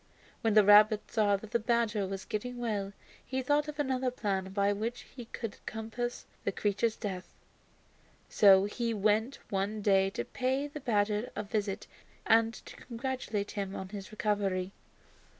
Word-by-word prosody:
When 225 -2 +2
the 215 - +8
rabbit 210 +1 +6
saw 210 -3 +3
that 210 +2 -11
the 235 - +2
badger 225 -3 +1
was 195 0 -5
getting 245 +3 -4
well, 210 -5 -2 0.3
he 260 0 -3
thought 290 +3 +2
of 300 0 -6
another 260 -3 0
plan 200 -6 -2
by 200 +1 +2
which 225 +4 -3
he 245 -3 -7
could 225 -2 -7
compass 225 +2 -4 0.2
the - - 0
creature's 210 +3 0
death. 185 -4 -5 1.0
So 195 -2 +6
he 230 +2 -2
went 215 +5 +1
one 200 +2 -1
day 195 -1 +4
to 120 -10 -4
pay 260 +3 -1
the 290 +1 -8
badger 210 -2 0
a 210 - -2
visit 205 -1 -2 0.4
and 225 0 +4
to - - -10
congratulate 235 -4 -3
him 195 -1 -4
on 190 - -6
his 195 -1 -8
recovery. 200 -3 -1
215 Hz, 160 wpm, -31 LUFS, 200-235 Hz, 1.0 s, the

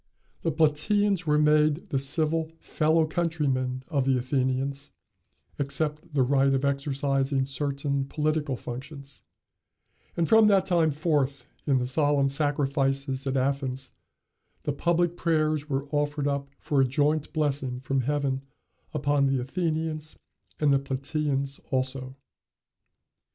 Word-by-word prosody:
The 165 - 0
Platæans 165 +5 +2
were 150 0 +3
made 150 +1 +3
the 135 - +1
civil 155 +3 0
fellow 160 +1 +2
countrymen 145 -6 -1
of 140 -5 0
the 135 -1 +3
Athenians, 135 +2 -1 0.7
except 150 +3 -2
the 135 - +4
right 135 +1 +3
of 135 +1 0
exercising 140 -1 0
certain 140 0 -1
political 150 -2 -1
functions; 140 +3 -8 1.0
and 170 -1 +2
from 220 -1 +6
that 195 -2 +4
time 170 -4 +3
forth 145 -4 0 0.2
in 140 -2 +4
the 125 - 0
solemn 140 +1 +2
sacrifices 140 -1 0
at 135 0 0
Athens, 135 -1 -1 0.7
the 145 - -1
public 170 +3 +1
prayers 155 -3 0
were 135 +1 -1
offered 145 -1 0
up 140 -1 -2
for 140 -2 +1
a - - +4
joint 150 +3 +1
blessing 140 -5 -1
from 135 +1 -1
Heaven 135 0 -1 0.5
upon 145 -1 +2
the 135 -1 +1
Athenians, 155 +2 -2 0.4
and 150 -2 +3
the 135 - +4
Platæans 140 0 -2
also. 130 0 -2
140 Hz, 125 wpm, -27 LUFS, 135-155 Hz, 1.0 s, from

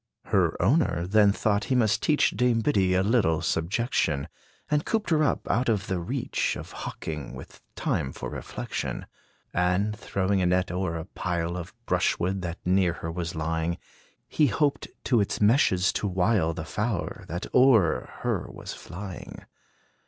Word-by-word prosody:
Her - - +1
owner 90 - +2
then 105 +1 +5
thought 105 0 0
he 130 - 0
must 110 -3 +2
teach 150 -1 +3
Dame 120 +1 +2
Biddy 95 -8 +2
a 95 - +3
little 100 -8 +2
subjection; 80 - 0 0.4
And 150 0 +1
cooped 220 -5 -1
her 155 -1 +4
up, 145 - 0
out 120 +4 +1
of 105 -4 +1
the 95 -1 -1
reach 85 - -1
Of - - -8
hawking, 75 -3 -6
with - - -11
time 65 - -1
for - - -6
reflection. - - -4 0.5
And, 90 +4 +1
throwing 100 -2 0
a 90 - +2
net 90 +1 +1
o'er 90 -2 -2
a 80 - -5
pile 85 -2 -2
Of 90 -2 -6
brush - - +1
wood 95 +2 -1
that 85 -1 -4
near 90 -1 +3
her 80 -1 -5
was 85 0 -4
lying, 80 +2 -1 0.5
He 150 - +3
hoped 145 +2 0 0.2
to 120 -4 +3
its 100 - -2
meshes 105 -4 +4
to 105 - -1
wile 90 -3 +1
The 80 - -5
fowler, 105 0 -3
that 85 +3 -4
o'er 125 -10 +4
her - - -1
was - - -8
flying. 95 0 -8
95 Hz, 165 wpm, -27 LUFS, 85-110 Hz, 0.5 s, then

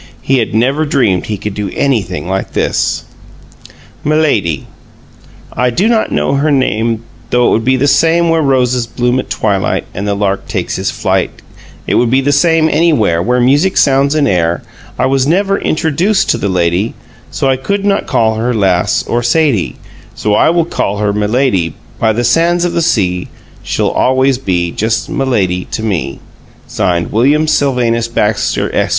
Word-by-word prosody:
He 135 -1 +2
had 110 -2 -2
never 135 +7 +1
dreamed 125 - +1
that - - -11
he 105 - -3
could 105 +1 -5
do 105 -1 -4
anything 105 -11 -1
like 95 +1 -3
this. - - 0 1.0
MILADY 140 - 0 0.9
I 125 - +1
do 180 - +1
not 225 -2 +1
know - - 0
her 140 +3 +1
name 115 -5 0 0.3
Though 125 0 +2
it - - +4
would 115 - +1
be 130 +2 +2
the 135 - +1
same 165 +3 +3
Where 165 -1 +2
roses 125 -4 +1
bloom 125 +2 0
at - - -5
twilight 100 -3 -1
And 100 +2 -4
the 100 - 0
lark 100 -1 -2
takes - - -3
his - - -1
flight - - 0 0.6
It - - -1
would 120 - +2
be 130 +3 +3
the 140 +2 +1
same 160 +2 +3
anywhere 150 - +2
Where 125 +6 +1
music 145 +10 +2
sounds 140 +1 +3
in 150 -2 +2
air 85 -4 0 0.3
I - - +1
was 135 0 +1
never 195 +4 +1
introduced 170 +6 +1
to - - -1
the 100 - -1
lady 90 +3 0 0.3
So - - -2
I 135 - +3
could 200 +10 -2
not 200 -1 0
call 110 -1 +1
her 120 +2 -1
Lass 95 -2 +1
or 120 - -1
Sadie 120 - +1 0.4
So 105 - -1
I - - +4
will 170 0 +2
call 105 -10 -2
her 105 -1 0
Milady 105 - 0 0.2
By 110 - +2
the 120 +3 -1
sands 170 +8 +2
of 175 - -2
the 170 - 0
sea 90 - 0 0.3
She - - -2
always 130 0 +1
will 135 - -22
be 85 -2 0
Just 110 +4 -2
M'lady 100 -9 -1
to 110 - -4
me. 90 -10 -2 0.6
WILLIAM 115 - +1
SYLVANUS 120 -6 +1
BAXTER, 105 -2 -1
Esq. - - +1
125 Hz, 180 wpm, -13 LUFS, 105-145 Hz, 1.0 s, it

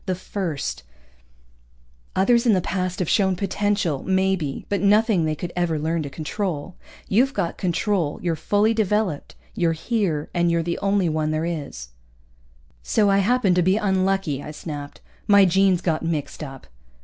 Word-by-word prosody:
The 185 - 0
first. 175 - -4 1.3
Others 235 +5 +3
in 225 - +5
the 190 - +3
past 185 0 -2
have 180 - -1
shown 190 0 +2
potential, 200 -5 -1
maybe, 190 -6 0
but 200 -3 -1
nothing 205 -3 +3
they 155 0 0
could 175 +3 -6
ever 175 -3 0
learn 160 +2 -1
to 145 - -5
control. 160 +3 -4 0.3
You've 255 +7 +2
got 175 -4 -2
control, 180 -3 0
you're 170 -2 0
fully 210 +6 +2
developed. 210 -7 -1 0.2
You're 170 -2 +1
here, 165 -3 -2
and 175 -1 +2
you're 170 0 +1
the 170 +1 -3
only 200 -2 +1
one 155 -1 0
there 155 +1 -1
is." 140 - -5 0.9
"So 205 - +2
I 195 - +4
happened 205 -2 +2
to - - +4
be 185 +3 +3
unlucky," 190 -7 0
I - - -8
snapped. 150 -2 -7 0.3
"My 200 -1 +7
genes 190 0 +3
got 165 -3 0
mixed 160 -3 -3
up." 135 -2 -9
180 Hz, 160 wpm, -23 LUFS, 160-200 Hz, 1.3 s, My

